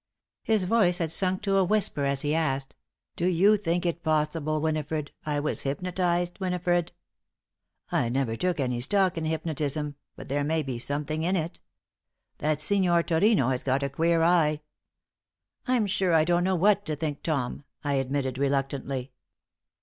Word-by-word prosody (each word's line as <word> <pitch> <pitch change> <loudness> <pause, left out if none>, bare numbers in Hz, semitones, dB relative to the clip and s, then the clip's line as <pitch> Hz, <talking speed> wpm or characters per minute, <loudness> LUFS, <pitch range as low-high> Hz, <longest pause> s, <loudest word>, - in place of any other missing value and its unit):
His 220 -3 +2
voice 180 -3 +3
had 165 -4 -2
sunk 185 +3 0
to 195 -2 +2
a 195 - +4
whisper 185 -7 +1
as 140 -1 0
he 150 0 0
asked: 135 -4 -1 0.4
"Do 175 - 0
you 185 +4 +5
think 175 -3 -1
it 170 0 -1
possible, 155 -1 0
Winifred, 155 -1 -2 0.2
I 145 -1 0
was 150 +1 -1
hypnotized, 175 +4 -1
Winifred? 180 -2 0 1.0
I 115 - +1
never 125 -2 0
took 180 +5 -1
any 125 -3 -1
stock 190 +6 +2
in 165 -1 -3
hypnotism, 155 -2 -2 0.2
but - - -10
there 145 +1 0
may 160 +2 0
be 130 -4 -4
something 150 +4 -2
in 180 +4 +1
it. 165 -1 -3 0.8
That 150 0 0
Signor 175 0 +2
Turino 165 - +3
has 125 - -1
got 135 +1 0
a 140 - -1
queer 165 +3 +2
eye." 160 -3 +3 1.1
"I'm 250 -4 +2
sure 190 -3 +1
I 155 - +5
don't 175 +1 +2
know 190 0 +2
what 200 +3 +3
to 155 - -1
think, 150 -1 -4
Tom," 140 -4 -2 0.2
I 145 -1 0
admitted, 135 -1 -1
reluctantly. 135 -1 -1
160 Hz, 165 wpm, -27 LUFS, 140-180 Hz, 1.1 s, you